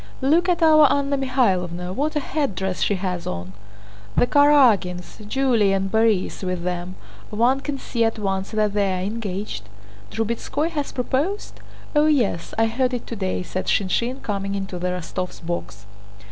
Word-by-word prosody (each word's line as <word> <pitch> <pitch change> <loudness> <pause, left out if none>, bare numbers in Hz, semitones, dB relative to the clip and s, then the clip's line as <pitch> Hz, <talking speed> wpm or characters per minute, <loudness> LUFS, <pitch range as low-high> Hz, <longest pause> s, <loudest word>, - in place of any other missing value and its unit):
"Look 325 +7 +3
at 345 -2 +2
our 310 -3 +7
Anna 280 0 +1
Mikháylovna—what 230 - 0
a - - +2
headdress 195 - -2
she 205 - +2
has 180 -2 -3
on!" 90 +1 -5 0.6
"The - - +5
Karágins, 245 -12 +4
Julie—and 210 -7 +2
Borís 220 -4 +1
with 180 -2 -2
them. 180 +1 -3 0.3
One 240 +5 +2
can 285 0 -4
see 235 -3 -1
at 225 0 +1
once 195 -2 -2
that 215 -2 0
they're 195 -3 +1
engaged...." 195 - -4 0.4
"Drubetskóy 235 +8 -2
has 295 -4 -3
proposed?" 285 +11 -2 0.4
"Oh 300 +1 +5
yes, 240 - +1
I 225 - +4
heard 250 +3 0
it 240 - -5
today," 190 -5 -3
said 185 +1 -4
Shinshín, 235 +7 0
coming 200 -1 -2
into 195 -2 -4
the 180 - -1
Rostóvs' 180 0 -4
box. 105 -12 -5
215 Hz, 145 wpm, -23 LUFS, 185-270 Hz, 0.6 s, our